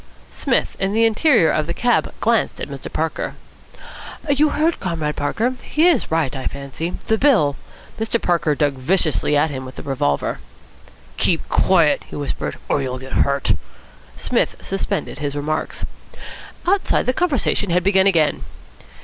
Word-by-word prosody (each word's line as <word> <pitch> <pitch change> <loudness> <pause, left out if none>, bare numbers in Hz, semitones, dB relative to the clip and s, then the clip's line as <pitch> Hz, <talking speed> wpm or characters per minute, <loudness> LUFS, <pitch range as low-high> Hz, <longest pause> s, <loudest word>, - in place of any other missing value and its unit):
Psmith, - - 0
in 195 +1 0
the 225 +1 +4
interior 225 - +4
of 155 0 0
the 170 - -3
cab, 245 0 +1
glanced - - +1
at - - -4
Mr. - - -7
Parker. - - -2 0.9
"You 290 +1 +3
heard, 315 +3 +1
Comrade 160 -5 -2
Parker? 220 - 0
He 315 +3 +2
is 330 -10 +2
right, 160 -4 0
I 130 - -3
fancy. 140 +5 -5
The 220 -1 +1
bill 210 - +4 0.2
" - - -20
Mr. 225 +1 0
Parker 160 -6 +1
dug 145 -1 +1
viciously 150 +2 +1
at 150 +1 +2
him 130 -1 -5
with 130 0 -9
the - - -8
revolver. 125 - -1 0.8
"Keep 170 -3 +2
quiet," 170 -5 +3
he - - -8
whispered, 145 -1 -4
"or 145 - +1
you'll 130 -1 -3
get 130 +1 -10
hurt." 140 -6 +2 0.6
Psmith - - 0
suspended - - -3
his 145 -1 -3
remarks. 155 +2 -2 0.8
Outside, 385 +2 +2
the 255 - +1
conversation 270 - +1
had 175 +1 +2
begun 190 0 +4
again. 165 -6 +2
165 Hz, 160 wpm, -20 LUFS, 145-225 Hz, 0.9 s, the